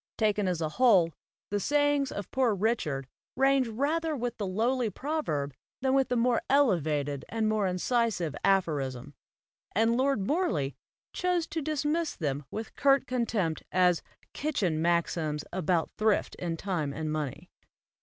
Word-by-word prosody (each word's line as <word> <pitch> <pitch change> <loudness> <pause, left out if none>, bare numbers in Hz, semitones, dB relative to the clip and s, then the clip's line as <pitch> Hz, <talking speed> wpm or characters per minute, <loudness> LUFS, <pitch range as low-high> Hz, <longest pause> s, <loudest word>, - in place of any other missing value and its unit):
Taken 210 -2 +1
as 175 -2 -1
a 155 - 0
whole, 190 -10 +5 0.4
the 205 - +1
sayings 290 +3 +2
of 205 - -6
Poor 250 -5 +2
Richard 180 - -1 0.3
range 270 -1 +3
rather 305 +7 0
with 245 -2 -3
the 205 - -1
lowly 230 +5 +1
proverb 195 - -2 0.3
than 265 0 +2
with 270 -1 +3
the 250 - +1
more 240 0 +2
elevated 155 - +2
and 225 -1 0
more 215 -2 +1
incisive 185 - 0
aphorism; 145 -9 0 0.6
and 225 +3 +3
Lord 260 -5 +1
Morley 190 - 0 0.4
chose 360 -2 0
to 325 - -2
dismiss 305 +2 -1
them 145 -3 -2
with 220 +6 -6
curt 275 -1 +4
contempt 230 -10 -1
as 180 -2 +3 0.3
"kitchen 195 - -1
maxims 165 -3 0
about 175 -2 0
thrift 215 -1 +2
in 170 -2 -2
time 165 -7 -2
and 155 0 -3
money." 150 -4 -4
210 Hz, 145 wpm, -29 LUFS, 165-265 Hz, 0.6 s, whole